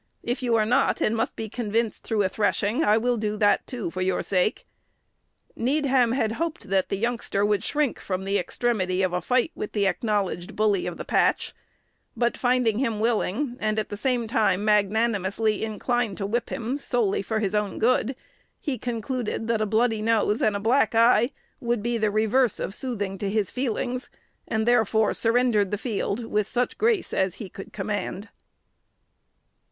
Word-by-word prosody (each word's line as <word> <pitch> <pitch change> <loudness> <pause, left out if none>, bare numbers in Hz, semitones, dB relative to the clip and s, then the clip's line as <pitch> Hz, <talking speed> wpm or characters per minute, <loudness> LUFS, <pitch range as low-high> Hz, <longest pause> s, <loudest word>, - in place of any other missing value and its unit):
If 245 +3 -2
you 240 -2 +1
are 215 -1 +3
not, 250 +5 +2
and 215 - +1
must 225 +2 -1
be 220 - -4
convinced 225 0 -2
through 215 -3 0
a - - +2
threshing, 205 +2 0
I 210 +1 +4
will 240 +1 +1
do 215 -1 -2
that, 205 -1 +2
too, 235 -9 -4
for 185 - -4
your 185 0 0
sake." 190 +1 0 0.9
Needham 260 -2 +2
had 225 -4 +1
hoped 305 - -4
that 190 -1 +2
the 195 - -1
youngster 230 -2 -1
would 205 -2 +1
shrink 295 -3 0
from 185 -1 -3
the 200 +1 +1
extremity 190 -3 0
of 185 -1 0
a 180 - 0
fight 250 -1 +1
with - - -6
the 205 -2 +1
acknowledged 190 -2 -1
"bully 205 -4 +1
of 175 - -5
the - - -6
patch;" - - +1 0.6
but 240 -1 +1
finding 245 -3 +1
him 230 -5 0
willing, 235 +3 0
and 215 0 0
at 215 - -1
the - - -4
same 245 +2 0
time 210 -3 +1
magnanimously 210 0 +1
inclined 220 0 -1
to 195 - -3
whip 230 +4 -1
him 245 +5 -3
solely 240 -8 0
for 220 +2 -2
his 210 -2 -1
own 210 -2 -1
good, 250 +2 +2 0.4
he 275 -7 -3
concluded 235 -1 -3
that 230 -2 +1
a 215 - +1
bloody 220 +1 +1
nose 220 -1 +1
and 215 -1 +2
a - - -1
black 225 +1 +2
eye 230 +1 +5 0.3
would 235 -4 -1
be 235 0 0
the 215 -1 +2
reverse 220 +3 +2
of - - -3
soothing 205 -6 -4
to 200 - -2
his 210 -1 0
feelings, 250 0 -2 0.4
and 220 0 -1
therefore 220 -3 +3
surrendered 230 -4 +2
the 205 - -1
field 225 0 -2
with 210 -1 -1
such 245 +1 -1
grace 445 -3 +1
as 190 -1 +1
he 205 -2 -8
could 195 - -10
command. 205 0 -4
220 Hz, 180 wpm, -25 LUFS, 205-240 Hz, 0.9 s, eye